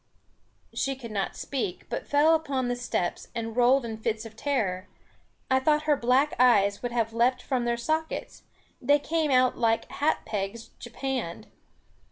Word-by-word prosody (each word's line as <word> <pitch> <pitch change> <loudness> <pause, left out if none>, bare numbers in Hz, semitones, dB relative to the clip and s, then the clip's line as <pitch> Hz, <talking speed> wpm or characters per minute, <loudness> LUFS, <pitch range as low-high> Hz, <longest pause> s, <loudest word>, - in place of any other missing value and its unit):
She 270 0 -1
could 240 -4 -9
not 200 -2 -2
speak, 240 -10 -4
but - - -5
fell 300 +3 +4
back 320 - -17
upon 260 -3 -1
the 245 - 0
steps, 245 -7 -2
and 225 -1 -4
rolled 250 +1 +4
in 225 -1 -5
fits 220 0 -2
of 220 -1 -10
terror. 205 -8 -1 0.6
I 260 - +5
thought 300 +3 +2
her 305 -1 +3
black 265 +4 +2
eyes 200 -5 +4
would 245 - -3
have 230 -2 -1
leaped 250 +2 +2
from 255 -3 -1
their 235 0 0
sockets; 315 +7 -3 0.4
they 285 +3 +4
came 315 +1 -1
out 255 -1 +3
like 225 -1 +1
hat 300 +2 0
pegs 215 +1 -4
japanned. 240 -6 -4
245 Hz, 170 wpm, -27 LUFS, 225-275 Hz, 0.6 s, I